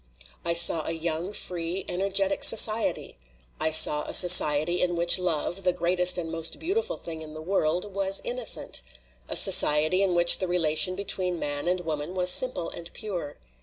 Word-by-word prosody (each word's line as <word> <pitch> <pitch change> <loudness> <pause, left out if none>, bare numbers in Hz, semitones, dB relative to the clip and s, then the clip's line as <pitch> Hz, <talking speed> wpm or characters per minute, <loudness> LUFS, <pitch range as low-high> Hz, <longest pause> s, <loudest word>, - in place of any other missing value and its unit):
''I 170 0 -3
saw 170 -1 +1
a 165 - -4
young, 165 +3 -6
free, 175 -2 -7
energetic 195 +1 -2
society. 220 - +2 0.4
I 160 - +1
saw 150 -1 +5
a - - -3
society 175 -2 +5
in 175 -1 -2
which 170 +2 +3
love 175 +1 -4
the 180 -1 -2
greatest 180 +1 +1
and 165 -2 -7
most 165 0 -6
beautiful 455 +8 -5
thing 160 -1 -8
in 155 -1 -12
the - - -10
world 180 +2 -4
was 195 0 -1
innocent; 245 -2 -3 0.5
a - - -6
so - - +6
ciety 155 +5 +4
in 190 -3 -2
which 175 0 +5
the 185 - -4
relation 175 +1 -1
between 185 -2 -1
man 145 0 -6
and 180 0 -2
wom 155 -3 -6
an 170 +5 -10
was 180 -1 +2
simple 255 -5 +2
and 170 0 -12
pure. 180 -9 -8
175 Hz, 180 wpm, -23 LUFS, 160-190 Hz, 0.5 s, so